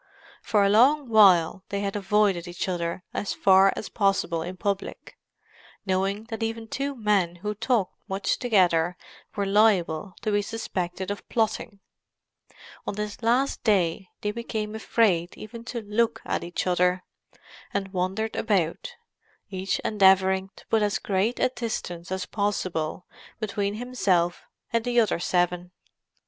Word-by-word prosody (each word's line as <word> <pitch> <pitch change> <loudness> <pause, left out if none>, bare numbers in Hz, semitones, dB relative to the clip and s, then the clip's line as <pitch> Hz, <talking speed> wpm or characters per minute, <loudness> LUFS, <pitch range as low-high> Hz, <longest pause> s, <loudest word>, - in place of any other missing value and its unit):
For 210 -2 +2
a - - +3
long 260 +6 +4
while 190 -4 +5
they 200 0 -2
had 200 0 -2
avoided 200 -3 +1
each 175 +2 -4
other 175 -1 -3
as 205 - -2
far 195 0 +5
as 210 - -5
possible 195 -5 0
in 180 +3 -6
public, 200 +1 -4 0.7
knowing 195 +2 0
that 225 - -4
even 225 0 -3
two 275 +4 -3
men 205 -7 +1
who 210 - 0
talked 220 -2 0 0.2
much 195 +1 -1
together 180 -7 +2 0.4
were 200 -2 0
liable 195 -4 +2
to 215 - 0
be 205 0 +2
suspected 190 -4 -4
of 205 - -7
plotting; 220 -2 -1 1.1
on - - -2
this 210 +1 -5
last 245 +4 +1
day 190 -4 +1
they 210 - -1
became 220 -1 -4
afraid 205 -6 +1
even 230 +2 -9
to 240 -1 -4
look 215 +3 0
at - - -2
each 175 0 -3
other, 180 0 +2 0.7
and 195 -1 -3
wandered 190 +4 -1
about, 190 -7 -1 0.6
each 190 0 -1
endeavouring 190 -2 +3
to - - -16
put 225 - +1
as 205 -1 +1
great 200 +5 0
a - - +3
distance 185 -8 -5
as 190 -1 -2
possible 185 -6 -2 0.3
between 205 -1 -2
himself 195 -8 0 0.3
and 230 -1 +2
the 245 0 +2
other 220 -6 +2
seven. 180 0 0
200 Hz, 145 wpm, -26 LUFS, 185-220 Hz, 1.1 s, while